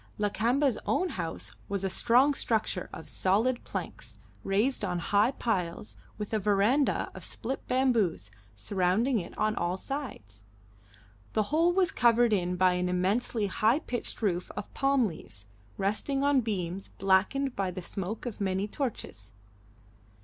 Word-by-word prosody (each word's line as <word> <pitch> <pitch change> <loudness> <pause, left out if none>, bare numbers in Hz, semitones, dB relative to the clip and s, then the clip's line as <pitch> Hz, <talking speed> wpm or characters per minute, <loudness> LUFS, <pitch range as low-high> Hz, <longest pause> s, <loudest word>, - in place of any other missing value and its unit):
Lakamba's 230 +5 +1
own 370 - +1
house 170 - -5
was 200 -1 -2
a - - +1
strong 250 +8 +4
structure 225 -5 -1
of - - -9
solid 225 +7 +1
planks, - - -6 0.3
raised 215 +6 +1
on 180 -3 -1
high 205 +6 +3
piles, 205 -8 -2 0.2
with 210 +1 -5
a 220 - +2
verandah 210 +8 +2
of - - -10
split 260 +4 -4
bamboos 225 - +1 0.2
surrounding 195 - +1
it 170 - -8
on 215 0 +1
all 175 +2 -1
sides; 185 - -6 0.9
the 215 - +2
whole 335 +3 +4
was 365 -1 +2
covered 235 -1 +4
in 180 -2 +1
by 185 0 +4
an 180 0 0
immensely 205 +5 0
high 215 +5 +2
pitched 245 -6 -3
roof 180 -3 0
of - - -6
palm 275 -2 +3
leaves, 115 - -7 0.3
resting 215 +8 0
on 285 -2 +4
beams 190 -4 -3
blackened 205 +8 +1
by 195 -1 -1
the 180 0 -6
smoke 195 +6 -5
of 230 -4 -5
many 190 +1 0
torches. 200 - -5
210 Hz, 145 wpm, -29 LUFS, 185-250 Hz, 0.9 s, strong